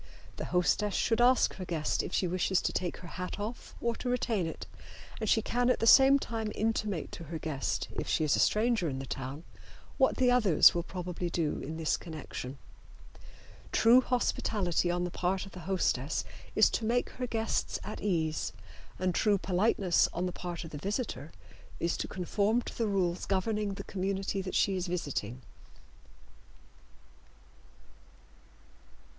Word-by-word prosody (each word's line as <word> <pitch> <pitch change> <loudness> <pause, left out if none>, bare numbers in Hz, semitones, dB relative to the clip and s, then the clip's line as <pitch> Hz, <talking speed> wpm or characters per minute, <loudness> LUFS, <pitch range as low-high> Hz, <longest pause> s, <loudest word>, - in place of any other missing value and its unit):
The - - -4
hostess 185 +3 +1
should 225 0 +2
ask 250 0 +4
her 190 - -5
guest 160 -3 -1
if - - -6
she 185 - +1
wishes 185 +1 +1
to - - 0
take 175 -2 -2
her 180 - -10
hat 180 +3 -5
off 220 +4 -6
or 235 0 0
retain 235 -7 0
it, 160 - -6 0.5
and 220 -2 -1
she 220 - +3
can 245 +1 +1
at - - +2
the 225 - +1
same 270 +3 +8
time 225 -5 -3
intimate 215 -6 -1
to 170 - -8
her 165 +2 -5
guest, 155 -3 -2
if - - -3
she - - +1
is 150 - +3
a - - 0
stranger 220 -5 +2
in 135 - -4
the 135 - -5
town, 135 +4 -5 0.6
what 265 - +3
the 250 -1 +4
others 215 -11 +6
will 175 - 0
probably 180 0 -4
do 165 -3 -1
in 160 +3 -6
this 160 -1 +1
connection. 145 -4 -7 1.1
True 235 +3 +6
hospitality 210 -8 0
on 175 0 0
the 180 - -3
part 185 +3 -1
of 195 - -12
the 185 - -9
hostess 150 -7 0 0.3
is - - +5
to - - -1
make 240 +2 +1
her 250 -1 -4
guests 225 -1 -1
at 215 - -6
ease, 160 -6 -1 0.4
and 185 0 0
true 205 +3 +3
politeness 190 -1 +2
on 175 - -1
the 180 - -2
part 175 -1 -5
of 165 - -9
the 145 - -6
visitor 200 - -3 0.5
is 170 - 0
to - - -3
conform 205 +6 0
to - - -8
the 230 - 0
rules 185 -3 0
governing 200 +1 0
the - - -6
community 195 0 -2
that 185 0 -5
she 195 - +3
is 185 0 -2
visiting. 135 -8 -3
185 Hz, 170 wpm, -30 LUFS, 170-220 Hz, 1.1 s, same